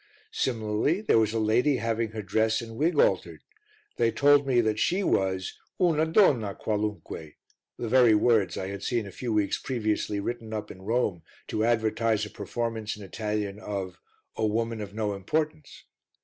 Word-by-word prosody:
Similarly 115 - 0
there 205 - +3
was 110 -1 +2
a 115 - -2
lady 120 +6 +2
having 115 0 -1
her 110 -1 -6
dress 110 +2 +1
and 115 -1 -8
wig 155 +8 +1
altered, - - +1 0.5
they 115 - +3
told 145 +3 +4
me 120 -5 +2
she 185 - +1
was 95 - 0 0.2
"una 160 -3 +3
donna 130 - +3
qualunque" 105 -7 -4 0.4
the 120 - -4
very 120 -2 +5
words 105 -3 +2
I 95 - -3
had 100 -1 -6
seen 120 -4 -1
a 100 - -8
few 120 +5 -4
weeks 105 -2 +1
previously 110 -4 -1
written 110 +1 -4
up 105 - -5
in 95 - -12
Rome 105 -4 0 0.3
to 110 - 0
advertise 110 -1 +1
a 105 - -10
performance 115 -3 -4
in 105 - -10
Italian 105 0 -3
of 95 -4 -5 0.4
A - - -2
Woman 115 +1 0
of 100 -1 -6
no 105 -1 -2
Importance. 155 +9 -3
110 Hz, 165 wpm, -27 LUFS, 105-120 Hz, 0.5 s, very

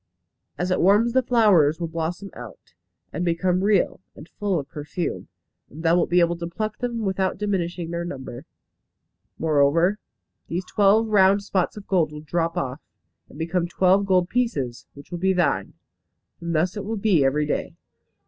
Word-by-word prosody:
As 180 +1 -2
it 185 - +1
warms 210 +6 +4
the 260 - +4
flowers 200 - +4
will 170 - -2
blossom 165 +4 -4
out, - - -12 0.4
and 175 - -2
become 180 +2 +1
real, 200 -2 +2 0.2
and 150 - -12
full 200 -3 -2
of 140 -3 -4
perfume, 150 +5 -5 0.4
and 155 +4 -10
thou 165 0 +4
wilt 175 - +1
be 175 0 +4
able 170 0 +2
to 170 0 -5
pluck 215 +5 -4
them 240 -2 -3
without 190 -1 -1
diminishing 180 -4 -2
their 170 0 -3
number. 135 -4 -7 0.9
Moreover, 160 +6 +2 0.5
these 180 +2 -3
twelve 210 +3 +3
round 200 -1 +4
spots 190 -1 -1
of 205 - -9
gold 175 -5 +1
will 150 0 -8
drop 165 +2 -2
off, 135 +3 -3 0.5
and - - -14
become 170 +2 -1
twelve 190 +3 +2
gold 180 -2 +3
pieces, 155 - -2
which 140 +4 -14
will 175 - -4
be 190 +2 +2
thine. 180 -2 0 0.7
And 170 0 -3
thus 175 +5 +1
it 210 - -4
will 220 +2 -3
be 195 -8 +3
every 145 +3 +1
day. 150 - -3
175 Hz, 175 wpm, -23 LUFS, 165-200 Hz, 0.9 s, warms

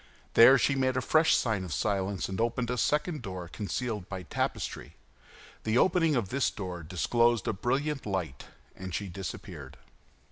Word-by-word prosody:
There 130 +4 +8
she 140 - +2
made 130 -1 +1
a - - +3
fresh 160 +4 +4
sign 110 -6 0
of 90 - -7
silence, 95 +2 -1
and 95 +3 -3
opened 120 +1 -1
a 125 - -2
second 150 +4 0
door 95 -5 -6
concealed 105 +1 -4
by 95 -2 -5
tapestry. - - -3 0.7
The 110 +2 +1
opening 165 -1 +3
of 110 -7 -1
this 135 -1 +1
door 90 -4 -6
disclosed 115 +7 +1
a - - +1
brilliant 135 +6 -1
light, 90 -10 -3 0.3
and 95 -2 -6
she 100 - -3
disappeared. 75 -7 -8
110 Hz, 165 wpm, -29 LUFS, 95-130 Hz, 0.7 s, There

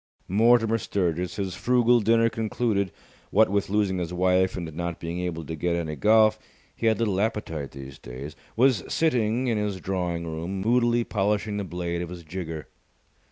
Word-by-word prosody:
Mortimer 115 +2 +4
Sturgis, 90 -3 -1
his 95 -2 -3
frugal 120 +3 +3
dinner 115 +1 +4
concluded 110 -3 -1 0.4
what 110 +1 +4
with 100 0 0
losing 100 -2 +1
his 85 -1 -3
wife 95 +1 +2
and 85 -3 -5
not 85 +1 -4
being 85 +1 -4
able 85 -3 -3
to 80 - -5
get 85 +2 0
any 80 -3 -3
golf, 110 +3 +4 0.4
he 115 - -1
had 110 - +3
little 105 -4 0
appetite 90 -10 -2
these 70 0 -10
days 65 +5 -8 0.2
was 125 -4 +4
sitting 125 -6 +1
in 115 -4 +1
his 105 -2 -2
drawing 90 -3 -2
room, 85 +4 -4
moodily 120 +2 +3
polishing 105 0 -1
the 100 - -2
blade 85 -1 -3
of 90 - -5
his 90 -1 -8
jigger. 80 -2 -6
95 Hz, 170 wpm, -26 LUFS, 85-110 Hz, 0.4 s, Mortimer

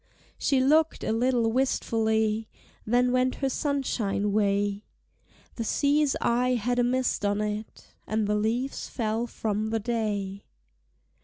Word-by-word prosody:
She 270 - +2
looked 310 +4 +3
a - - -1
little 235 0 +2
wistfully, 220 -3 0 0.4
Then 245 +2 +3
went 255 0 +2
her 270 - -1
sunshine 245 -8 -1
way: 205 0 +1 0.7
The 230 - -2
sea's 285 +5 +2
eye 250 +2 +2
had 245 +2 0
a - - +4
mist 255 -2 0
on 205 0 +1
it, 210 +1 -4 0.2
And 215 0 0
the 210 - 0
leaves 230 +6 -1
fell 225 0 -2
from 215 -2 -2
the 225 0 0
day. 205 -4 -2
225 Hz, 135 wpm, -27 LUFS, 210-255 Hz, 0.7 s, a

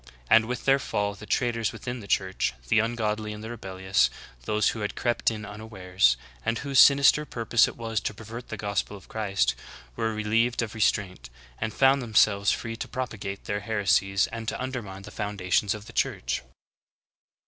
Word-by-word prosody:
And 115 0 +7
with 125 0 -4
their 135 0 +5
fall, 105 -5 -1
the 105 +1 -12
traitors 115 -4 0
within 125 0 -6
the 100 - -10
Church, 95 -12 0 0.2
the - - +5
ungodly 110 -2 -1
and 105 +1 -9
the 110 - -6
rebellious, 95 - 0 0.4
those 105 0 +2
who 115 - -4
had 105 -1 -3
crept 120 -1 +1
in 105 -2 -6
un 105 0 -9
awares, 95 - +1 0.3
and 115 +1 0
whose 140 0 +1
sinister 140 +2 +7
purpose 120 -4 +2
it - - -8
was 115 -2 -2
to 105 - -3
pervert 115 +3 -9
the 110 - -5
gospel 100 0 -2
of 95 - -17
Christ, 100 - 0 0.4
were 115 0 -1
relieved 115 +3 +1
of 110 - -5
restraint, 100 - 0 0.3
and 110 0 -2
found 135 +4 +4
them 115 -3 -8
selves 100 -2 +5
free 115 0 -1
to - - -5
propagate 105 -6 -5
their 105 -1 -2
heresies 100 -2 +2
and 115 -1 -6
to - - -2
undermine 115 -7 -5
the 105 - -10
foundations 100 0 0
of 105 0 -10
the - - -12
Church. - - -1
110 Hz, 185 wpm, -27 LUFS, 100-115 Hz, 0.4 s, And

